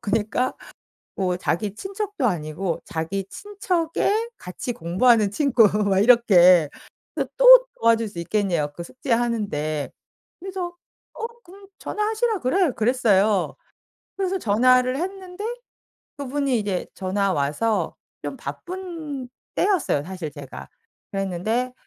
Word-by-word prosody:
그러니까 215 +4 0 0.6
뭐 185 -2 0
자기 190 +3 -2
친척도 395 - -3
아니고 170 -1 -2
자기 170 +4 -3
친척의 405 +2 -1
같이 180 +7 -5
공부하는 205 +5 +3
친구 255 -2 +3 0.2
막 195 -1 +2
이렇게. 185 - +6 0.4
그래서 - - -2
또 - - +9
도와줄 230 -1 +3
수 175 - -11
있겠냬요 170 -6 -1
그 170 - -6
숙제하는데. 215 - -2 0.5
그래서 365 -2 -5 0.4
"어 455 - -4 0.2
그럼 390 +3 -15
전화하시라 435 0 -1
그래." 340 +5 +2
그랬어요. 215 -5 +2 0.6
그래서 385 0 0
전화를 255 - +3
했는데 375 +3 -5 0.7
그분이 280 -2 -1
이제 200 -4 -2
전화 195 +1 0
와서 150 +10 0 0.3
좀 - - -5
바쁜 330 -8 -6 0.3
때였어요 365 - +1
사실 180 -4 -6
제가. 140 -2 -10 0.4
그랬는데 195 +6 -1
230 Hz, 270 characters per minute, -23 LUFS, -, 0.7 s, 또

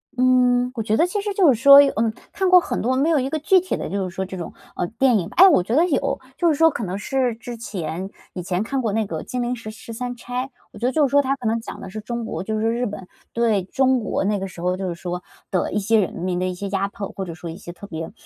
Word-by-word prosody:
嗯， 250 -1 +3
我 230 - -2
觉 215 0 0
得 335 - +4
其 400 +3 -2
实 410 0 -3
就 360 -8 +5
是 230 - -5
说 280 +1 +10
有 280 - +3
嗯， 225 0 +1 0.2
看 380 -2 0
过 365 0 +8
很 - - -3
多， 255 +3 +1
没 280 +5 +2
有 315 -3 +3
一 260 +1 -1
个 315 - -1
具 370 +5 +4
体 370 +1 -3
的， - - -5
就 195 -1 -2
是 175 - -14
说 190 - -2
这 190 0 -7
种， 170 - -6 0.2
嗯， 175 - -2
电 255 -2 +4
影。 170 - -4
哎， 380 - +9
我 325 - +5
觉 220 +7 -2
得 325 +4 +5
有， 275 -4 0 0.2
就 345 - +2
是 315 - +3
说 325 +3 +5
可 235 - -4
能 185 +1 -3
是 250 +2 -1
之 240 +1 -8
前， 190 -5 -5 0.2
以 180 - -5
前 180 +2 -1
看 270 +4 -2
过 220 -4 -1
那 220 0 +1
个 165 -5 -5
《金 250 - -3
陵 245 +1 -1
十 225 -2 -8
十 220 +1 -10
三 245 +1 -4
钗》。 245 +1 -4 0.3
我 - - -12
觉 235 - -2
得 255 - +2
就 290 +1 +3
是 - - -7
说 285 +2 +4
它 275 0 0
可 250 -4 -4
能 225 +1 +1
讲 225 - -9
的 - - -7
是 215 +3 -6
中 235 +2 -4
国， 220 - -4
就 215 +2 -2
是 225 +1 +1
日 240 +2 -1
本 200 -4 -6 0.3
对， 225 -5 +1
中 260 +6 +2
国 215 - -2
那 205 +1 0
个 195 - -4
时 185 -2 -11
候 180 +1 0
就 190 0 -3
是 175 - -3
说 180 +1 -5 0.3
的 185 - 0
一 210 - 0
些 220 +2 +3
人 195 - -1
民 180 +1 -2
的 185 - 0
一 185 - -2
些 200 +3 -5
压 195 0 0
迫， 200 0 -6
或 190 - -4
者 170 - -6
说 170 +1 -8
一 165 - -7
些 175 - -9
特 190 +3 -11
别， 160 -3 -6
225 Hz, 330 characters per minute, -22 LUFS, 190-260 Hz, 0.3 s, 说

